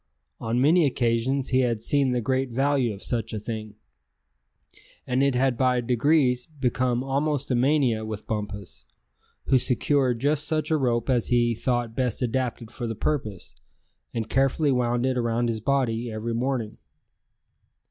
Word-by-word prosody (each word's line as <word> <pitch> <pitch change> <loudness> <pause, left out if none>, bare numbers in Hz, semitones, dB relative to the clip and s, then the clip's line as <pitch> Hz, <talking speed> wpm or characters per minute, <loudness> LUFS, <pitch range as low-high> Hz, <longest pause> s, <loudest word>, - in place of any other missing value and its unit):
On 115 +2 -1
many 155 +4 +4
occasions 125 +1 0
he 130 - +3
had 120 -3 +1
seen 135 +3 +1
the 125 -1 0
great 130 +2 0
value 135 0 +1
of 100 -1 -9
such 115 -3 -2
a 110 - -2
thing; 110 -1 -6 1.3
and 125 +1 0
it 140 -2 +2
had 130 0 +2
by 125 +1 +2
degrees 125 +1 +2
become 130 -4 -1
almost 140 +1 -1
a - - +3
mania 125 -3 +2
with 110 -1 -6
Bumpus; 105 -3 -5 0.6
who 130 - +4
secured 130 0 +1
just 145 +3 0
such 155 0 -1
a 160 - +4
rope 120 -4 0
as 125 -4 +1
he 120 -1 +2
thought 120 0 -2
best 125 -1 -1
adapted 120 -2 -2
for 120 -1 -5
the 115 - -3
purpose, 105 - -3 0.6
and 115 -2 -3
carefully 135 +3 +2
wound 120 -1 +1
it 130 -1 0
around 120 0 0
his 110 -1 -1
body 120 -2 0
every 110 +2 -3
morning. 120 -2 -2
125 Hz, 155 wpm, -25 LUFS, 115-135 Hz, 1.3 s, many